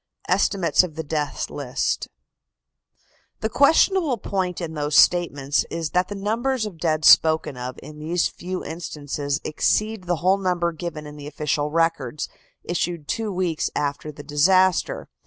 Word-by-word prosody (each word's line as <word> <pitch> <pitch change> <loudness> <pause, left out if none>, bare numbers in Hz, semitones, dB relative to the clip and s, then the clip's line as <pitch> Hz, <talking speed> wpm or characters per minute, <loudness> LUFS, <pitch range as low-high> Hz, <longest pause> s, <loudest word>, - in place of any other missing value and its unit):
ESTIMATES 180 -4 +3
OF 165 -4 -6
THE 160 - -4
DEATH 150 -2 -3
LIST. 135 -3 -2 1.3
The 220 - 0
questionable 315 - +3
point 185 -3 -2
in 165 -3 -5
those 150 -1 -2
statements 145 -5 +3
is 165 -2 -3
that 180 0 +2
the 205 - -6
numbers 225 +5 -1
of 190 -6 -8
dead 155 -3 0
spoken 160 -3 +5
of 125 +1 -6
in 150 0 -11
these 165 +3 0
few 185 +1 -6
instances 145 -3 -4
exceed 215 +5 0
the 175 0 +1
whole 185 +4 +2
number 180 -2 0
given 160 -2 -6
in 150 0 -10
the 145 0 -8
official 150 0 -1
records 160 -4 -1 0.3
issued 170 -3 -2
two 220 -2 -2
weeks 180 -4 -1
after 145 +1 -2
the 145 0 -11
disaster. 180 +5 +2
165 Hz, 150 wpm, -23 LUFS, 150-185 Hz, 1.3 s, spoken